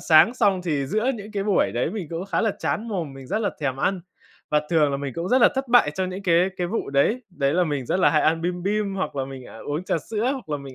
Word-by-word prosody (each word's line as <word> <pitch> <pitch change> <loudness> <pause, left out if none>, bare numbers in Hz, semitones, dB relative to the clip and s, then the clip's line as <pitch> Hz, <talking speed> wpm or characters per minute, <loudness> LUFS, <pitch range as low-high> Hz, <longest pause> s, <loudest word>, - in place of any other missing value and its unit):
sáng 170 +8 +5
xong 200 -6 +2
thì 145 -6 -1
giữa 215 - +1
những 210 -1 -9
cái 200 -2 -1
buổi 205 -2 +2
đấy, - - 0
mình 205 -6 -5
cũng 170 +3 -4
khá 200 - 0
là 225 - +2
chán 225 +3 -2
mồm, 170 -10 -3
mình 135 -1 -10
rất 215 - -1
là 215 -2 0
thèm 135 -3 -1
ăn. 185 +7 0 0.5
Và 150 0 +3
thường 155 -3 +3
là 140 - -1
mình 140 -2 -4
cũng 170 +2 -3
rất 255 +2 +4
là - - +8
thất 265 0 -2
bại 240 -11 +5
trong 185 -1 -2
những 190 +2 -6
cái 180 +1 +3
cái 180 - -1
vụ 205 -2 -3
đấy, 175 - +2
đấy 140 -6 0
là 180 +1 +3
mình 145 -6 -3
rất 185 - 0
là - - +5
hay 155 - +3
ăn 165 +1 +2
bim 175 0 -2
bim, 200 0 -1
hoặc 190 -6 -3
là 135 - -1
mình, 135 -1 -9
à, 110 - -12
uống 150 +5 -4
trà 165 - 0
sữa, 220 - -2
hoặc 260 - -7
là 150 - -1
mình 140 -2 -10
180 Hz, 295 wpm, -24 LUFS, 145-210 Hz, 0.5 s, là